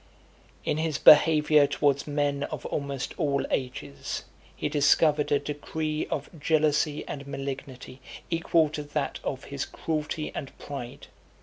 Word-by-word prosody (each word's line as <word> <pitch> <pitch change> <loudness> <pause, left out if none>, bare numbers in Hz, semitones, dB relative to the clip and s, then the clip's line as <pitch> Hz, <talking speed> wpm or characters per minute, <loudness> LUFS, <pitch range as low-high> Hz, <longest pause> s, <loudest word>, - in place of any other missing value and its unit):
XXXIV. - - -30
In - - 0
his 160 -2 -1
behaviour 150 -1 +7
towards 140 -1 +1
men 145 -1 0
of - - -7
almost 140 -2 -3
all 140 -4 +1
ages, 125 - -3 0.3
he - - -2
discovered 150 +1 +3
a 145 - +5
degree 150 +2 -3
of 145 - -3
jealousy 150 -1 +1
and 140 -1 -6
malignity 135 -2 -6 0.3
equal 165 -1 +3
to 150 0 -4
that 145 -1 -3
of 135 - -3
his 140 -1 -4
cruelty 155 -1 -3
and 135 - -7
pride. 130 -4 -7
145 Hz, 135 wpm, -27 LUFS, 140-155 Hz, 0.3 s, behaviour